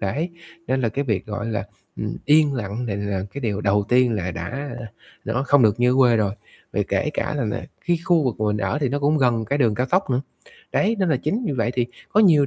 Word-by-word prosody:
Đấy, 145 - -2 0.4
nên 130 0 +1
là 115 - +1
cái 140 +5 -2
việc, 105 -6 -1
gọi 105 +1 -4
là, 105 -3 -2 0.3
ừm, 105 - -4
yên 150 -1 +5
lặng 115 +1 -3
này 100 -3 -2
là 100 -2 -2
cái 140 - -4
điều 105 -4 -1
đầu 100 0 +2
tiên 125 -1 +4
là 90 -3 -2
đã 115 - -5 0.5
nó 120 +5 -1
không 145 -3 +5
được 110 +1 +3
như 125 +1 +4
ở - - +1
quê 120 -3 +5
rồi. 100 -2 +1 0.4
Vì - - 0
kể - - 0
cả - - -1
nà - - 0
nà - - -3 0.2
cái 175 -1 +2
khu 170 -5 +3
vực 125 - 0
mà 110 - +1
mình 105 0 +1
ở 105 +9 -1
thì 140 - +1
nó 145 +3 -1
cũng 145 +2 +2
gần 120 -4 +2
cái 140 +7 -1
đường 115 -6 +3
cao 125 +3 0
tốc 185 -6 +2
nữa, 125 +1 +2 0.5
đấy, 220 +3 +2
nên 190 - +2
là 155 - +3
chính 195 - -2
vì - - 0
vậy 120 -2 0
thì 120 -2 +1 0.2
có 215 - +3
nhiều 155 -9 +6
125 Hz, 260 wpm, -23 LUFS, 105-145 Hz, 0.5 s, nhiều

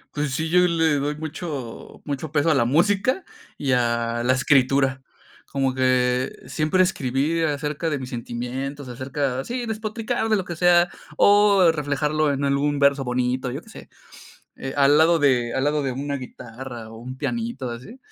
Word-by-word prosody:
Pues 150 -1 -1
sí, 160 +2 -1
yo 180 - +5
le 160 -3 +2
doy 145 +2 -2
mucho, 150 -5 -7
mucho 145 +1 -4
peso 160 +1 +2
a - - +4
la 135 -5 +2
música 200 - +2 0.3
y 140 -2 -1
a 120 -1 +1
la 125 +1 +3
escritura. 135 0 +2 0.5
Como 135 -2 0
que 130 -1 +1
siempre 155 +4 +1
escribí 150 -2 0
acerca 150 +1 -1
de 150 - -1
mis 130 -1 -7
sentimientos, 130 +4 -5
acerca, 130 +1 -3
sí, 245 - -4
despotricar 220 0 -3
de 215 - +4
lo 190 -3 -2
que 175 - -5
sea, 175 +1 +4 0.3
o 200 -3 +5
reflejarlo 150 0 0
en 140 0 -2
algún 140 +1 +1
verso 140 -1 +3
bonito, 125 +1 -1
yo - - -5
qué - - -19
sé. - - -12 0.7
Eh, 135 - -5
al 140 +1 +5
lado 165 +1 +5
de 125 -5 +2
al 130 - 0
lado 150 0 +1
de 135 -2 -2
una 140 +2 -3
guitarra 120 -2 -9
o 115 - -11
un 130 +3 -8
pianito 230 - -3
así, 125 - -9
140 Hz, 170 wpm, -23 LUFS, 130-160 Hz, 0.7 s, yo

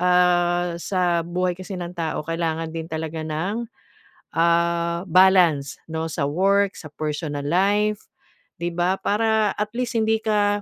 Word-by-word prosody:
ah, 175 -1 +3
sa 175 -2 +1
buhay 180 +1 0
kasi 190 +1 -7
ng 175 -1 -5
tao 160 -3 -2
kailangan 165 -1 -2
din 165 -1 -5
talaga 160 0 -4
ng, 190 +10 -2 0.7
ah, 170 0 +2
balance 175 -6 +4
no, 160 0 -2
sa 155 -3 -2
work, 195 +5 +2
sa 155 - -9
personal 150 -1 -3
life, 205 +6 +1 0.6
'di 175 - 0
ba? 175 +2 +1
Para 220 0 +2
at 210 0 -2
least 240 -1 -2
hindi 220 0 +2
ka, 205 -2 +1
175 Hz, 140 wpm, -23 LUFS, 165-200 Hz, 0.7 s, balance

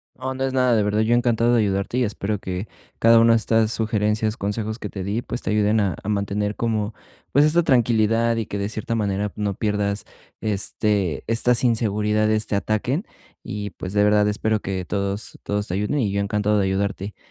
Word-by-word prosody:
No, 130 0 -4
no 135 - -3
es 135 - -1
nada, 125 -2 +3
de 105 - +3
verdad, 105 +1 0
yo 115 +2 +3
encantado 120 0 +2
de 115 - +4
ayudarte 100 +4 -1
y 130 - +3
espero 105 -1 -2
que 95 +2 -5 0.3
cada 115 0 +6
una 115 0 +6
de - - +5
estas 110 0 +1
sugerencias, 110 0 0
consejos 110 +2 -3
que 105 - -5
te 95 -2 -6
di, 105 +5 -2
pues, 120 - -4
te - - -4
ayuden 105 +1 +2
a 100 -3 0
a - - -8
mantener 105 0 -1
como, 110 -2 -1 0.4
pues, 145 +2 +5
esta 170 +3 +3
tranquilidad 115 -4 +2
y 115 -2 -2
que, 100 - -5
de 100 +1 -2
cierta 110 +1 -4
manera, 105 -2 -1
no 100 -2 -2
pierdas, 105 -1 -1 0.3
este 100 -3 -1
estas 115 +2 +3
inseguridades, 110 -2 +1
te 100 - -2
ataquen. 120 - -1 0.4
Y, 105 -1 -5
pues, 95 +2 -7
de 105 - +3
verdad, 105 0 +4
espero 110 +1 0
que 95 -2 -3
todos 100 +1 -3
todos 105 0 -2
te 90 - -4
ayuden 105 +9 -1
y 105 -7 +1
yo 100 0 0
encantado 105 0 +1
de 95 - +2
ayudarte. 100 +1 -2
105 Hz, 205 wpm, -22 LUFS, 100-115 Hz, 0.4 s, cada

